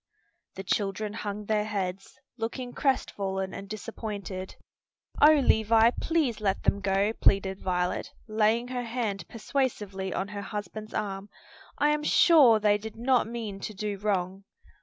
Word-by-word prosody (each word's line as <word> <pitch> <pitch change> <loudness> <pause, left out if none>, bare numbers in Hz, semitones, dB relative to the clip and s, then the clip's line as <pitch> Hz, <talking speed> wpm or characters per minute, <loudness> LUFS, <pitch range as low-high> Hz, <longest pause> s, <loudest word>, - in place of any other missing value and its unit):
The 195 - -6
children 205 +2 -1
hung 210 -1 -5
their 210 0 +1
heads, 195 -3 -4 0.2
looking 245 +2 -4
crestfallen 190 -8 -1
and 195 0 -8
disappointed. 205 -4 -6 0.7
"O 300 - +9
Levis, 225 -4 +4
please 295 -10 0
let 195 -2 0
them 200 - +2
go!" 195 +2 +1
pleaded 195 -3 +2
Violet, 180 -1 -1 0.2
laying 220 +2 +1
her 250 -1 -2
hand 220 -7 -3
persuasively 210 -6 -2
on 195 +1 -2
her 205 0 -5
husband's 210 +1 -6
arm. 200 -1 -3 0.5
"I 295 - +3
am 300 0 +1
sure 300 -6 +6
they 210 -1 +3
did 220 +1 -8
not 245 0 +2
mean 225 -4 -5
to 210 +1 -6
do 205 0 -3
wrong." 195 -2 -1
210 Hz, 140 wpm, -28 LUFS, 195-230 Hz, 0.7 s, O